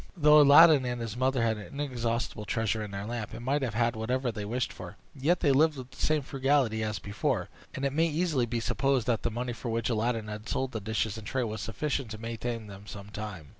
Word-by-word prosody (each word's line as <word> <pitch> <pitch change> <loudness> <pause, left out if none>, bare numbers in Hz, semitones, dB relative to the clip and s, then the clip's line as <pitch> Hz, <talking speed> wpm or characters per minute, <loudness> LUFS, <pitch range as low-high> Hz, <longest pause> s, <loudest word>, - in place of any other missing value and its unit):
Though 150 -1 +7
Aladdin 145 0 +8
and 125 -1 -2
his 115 -1 -4
mother 130 -1 +1
had 110 -1 +1
an 105 +7 -9
inexhaustible 120 -5 -2
treasure 110 -1 -1
in 105 - -5
their 100 0 -5
lamp, 115 -2 -5
and 120 +1 -8
might 140 +3 +1
have 120 -5 -2
had 120 0 +1
whatever 125 +3 -1
they 105 -2 -5
wished 125 +4 -2
for, 90 +1 -9 0.2
yet 150 +5 +1
they 145 - +4
lived 150 +2 +4
with 130 0 -8
the 130 - -16
same 155 -2 +2
frugality 135 -4 +1
as 110 -1 -2
before, 105 - -2 0.3
and 135 - -2
it 135 - 0
may 165 +3 +3
easily 155 -6 0
be 115 +1 -1
supposed 135 +1 +1
that 120 -3 +1
the - - 0
money 120 +2 -3
for 120 +1 -6
which 115 +1 -1
Aladdin 115 0 0
had 105 +1 -7
sold 130 -1 -1
the 110 - -4
dishes 110 0 -2
and 105 - -10
tray 130 -1 -1
was 110 -2 -4
sufficient 135 +2 -2
to 110 - -6
maintain 115 0 -4
them 100 0 -11
some 100 -1 -9
time. 105 -9 -7
120 Hz, 240 wpm, -29 LUFS, 110-135 Hz, 0.3 s, Aladdin